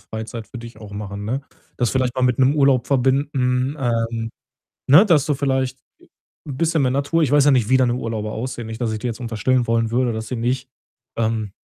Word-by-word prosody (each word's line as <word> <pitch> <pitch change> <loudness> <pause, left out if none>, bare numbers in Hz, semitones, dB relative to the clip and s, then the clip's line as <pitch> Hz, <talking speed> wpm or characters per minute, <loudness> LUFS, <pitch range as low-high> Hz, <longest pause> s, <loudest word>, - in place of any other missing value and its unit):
Freizeit 110 0 -6
für 120 - -9
dich 115 -2 -10
auch 105 -2 -11
machen, 100 0 -6
ne? 130 +6 -2 0.3
Das 120 -3 +1
vielleicht 130 -2 0
mal 130 - -2
mit 125 -1 +2
'nem 135 +2 +4
Urlaub 135 -3 +3
verbinden, 135 0 +1
ähm, 115 -2 -1 0.6
ne, 150 +10 +8
dass 160 -9 +3
du 150 - +1
vielleicht, 130 -1 -1 0.2
äh, - - -21 0.4
bisschen 155 +2 0
mehr 130 - +2
Natur 140 +5 0
ich 140 - 0
weiß 145 -1 +5
ja 145 - +6
nicht, 120 -5 +2
wie 130 - +5
deine 125 -2 +2
Urlauber 110 -3 -3
aussehen. 120 0 -5
Nicht, 110 +1 -7
dass 115 - 0
ich 110 - -3
dir 125 - -3
jetzt 115 0 -4
unterstellen 120 +2 0
wollen 115 -1 +1
würde, 120 -1 +1
dass 110 0 -5
sie 125 - -4
nicht, 125 +3 -2 0.5
ähm, 110 -3 -1
125 Hz, 215 wpm, -21 LUFS, 115-135 Hz, 0.6 s, ne